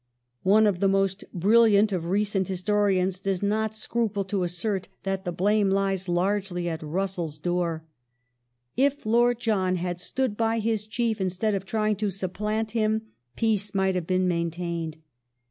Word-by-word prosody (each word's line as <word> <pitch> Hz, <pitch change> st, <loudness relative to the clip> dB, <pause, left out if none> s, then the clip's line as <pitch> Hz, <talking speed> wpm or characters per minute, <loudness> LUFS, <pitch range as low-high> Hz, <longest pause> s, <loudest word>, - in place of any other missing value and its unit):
One 210 Hz, +3 st, +5 dB
of 200 Hz, -4 st, +1 dB
the 195 Hz, -, +3 dB
most 195 Hz, 0 st, +1 dB
brilliant 210 Hz, +2 st, +4 dB
lish 190 Hz, -, +1 dB
Cab 165 Hz, -, -6 dB
of -, -, -4 dB
recent 195 Hz, -1 st, +1 dB
historians 190 Hz, -1 st, +1 dB
does 195 Hz, -1 st, -2 dB
not 215 Hz, +1 st, 0 dB
scruple 220 Hz, -2 st, -1 dB
to 195 Hz, 0 st, -1 dB
assert 180 Hz, +3 st, -2 dB, 0.2 s
that 195 Hz, 0 st, -2 dB
the 175 Hz, -, -1 dB
blame 200 Hz, +3 st, +2 dB
lies 195 Hz, -1 st, 0 dB
^^^^ -, -, -5 dB
largely 180 Hz, 0 st, 0 dB
at 165 Hz, -1 st, -3 dB
Russell's 170 Hz, -1 st, -3 dB
door. 170 Hz, -1 st, -1 dB, 0.5 s
" 120 Hz, 0 st, -51 dB, 0.2 s
If 280 Hz, +1 st, +1 dB
Lord 240 Hz, +2 st, +3 dB
John 195 Hz, -6 st, +1 dB
had 175 Hz, 0 st, -3 dB
stood 255 Hz, +4 st, -2 dB
by 225 Hz, +1 st, +1 dB
his 220 Hz, -1 st, -1 dB
Chief 225 Hz, -1 st, -1 dB
instead 190 Hz, +3 st, 0 dB
of 195 Hz, -1 st, -3 dB
trying 215 Hz, -1 st, 0 dB
to 210 Hz, 0 st, 0 dB
supplant 210 Hz, +4 st, -2 dB
him, 220 Hz, -1 st, 0 dB, 0.3 s
peace 210 Hz, -3 st, 0 dB
might 190 Hz, 0 st, +2 dB
have 180 Hz, -3 st, -2 dB
been 185 Hz, 0 st, +2 dB
main 170 Hz, -1 st, 0 dB
tained." 170 Hz, -2 st, -4 dB
195 Hz, 175 wpm, -26 LUFS, 180-215 Hz, 0.5 s, One